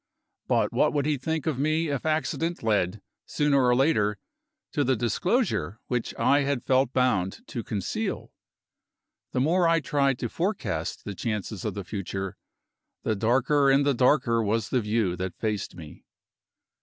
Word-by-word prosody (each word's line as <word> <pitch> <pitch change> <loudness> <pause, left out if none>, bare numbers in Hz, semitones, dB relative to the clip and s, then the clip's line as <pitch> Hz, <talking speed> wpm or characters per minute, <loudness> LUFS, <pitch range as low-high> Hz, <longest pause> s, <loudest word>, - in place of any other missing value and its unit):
But - - +1
what - - +2
would 145 -2 0
he 150 -3 0
think 160 +3 -2
of 155 -6 -1
me 155 +2 +1
if 140 +2 -2
accident 160 +1 -1
led, 105 -2 0 0.2
sooner 145 -2 +2
or 125 -1 +4
later, 110 -7 +2 0.5
to 145 - +1
the 130 0 +2
disclosure 120 - 0
which 125 -2 -2
I 140 - +4
had 140 -3 -1
felt 130 -1 +2
bound 110 -9 +1
to 120 - -4
conceal? 100 -4 -3 1.0
The - - -1
more 170 +5 +3
I 165 0 +4
tried 140 -4 +1
to 120 - -3
forecast 115 - -3
the 100 - -4
chances 105 -1 -4
of - - -2
the 100 - -4
future, 95 0 -4 0.7
the 110 - 0
darker 135 +6 +3
and 135 +1 +4
the 140 - +3
darker 125 -2 +3
was 110 0 0
the 125 - +1
view 105 -4 0
that 95 -1 -4
faced 105 -5 -3
me. 80 -4 -11
125 Hz, 160 wpm, -26 LUFS, 105-145 Hz, 1.0 s, or